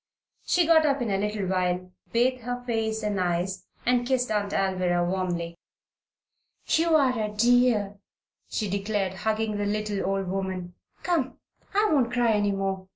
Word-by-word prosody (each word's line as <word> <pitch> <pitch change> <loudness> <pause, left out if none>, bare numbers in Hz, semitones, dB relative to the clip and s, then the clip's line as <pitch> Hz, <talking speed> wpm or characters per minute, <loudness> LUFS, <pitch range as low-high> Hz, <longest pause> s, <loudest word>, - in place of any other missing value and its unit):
She 350 -1 +3
got 320 -1 +6
up 280 -2 +2
in 225 - -2
a 195 - +1
little 210 -1 -1
while, 180 -1 -1 0.2
bathed 250 +2 +2
her 245 +1 -4
face 220 -2 -1
and 205 -2 -1
eyes, 180 +2 -1 0.2
and 245 0 +2
kissed 250 -3 +1
Aunt 205 -1 0
Alvirah 185 -3 +1
warmly. 175 -2 -2 1.1
"You 330 0 +3
are 260 -5 +3
a 210 - -1
dear!" 220 -2 +3 0.5
she 215 - -2
declared, 200 -1 -1
hugging 215 +1 -1
the 205 - -1
little 210 -1 -1
old 195 0 -1
woman. 185 -1 -3 0.3
"Come! 330 -7 0 0.4
I 420 +1 +4
won't 250 -5 +2
cry 240 -2 +2
any 205 -1 +2
more. 195 -1 -2
210 Hz, 160 wpm, -26 LUFS, 190-245 Hz, 1.1 s, got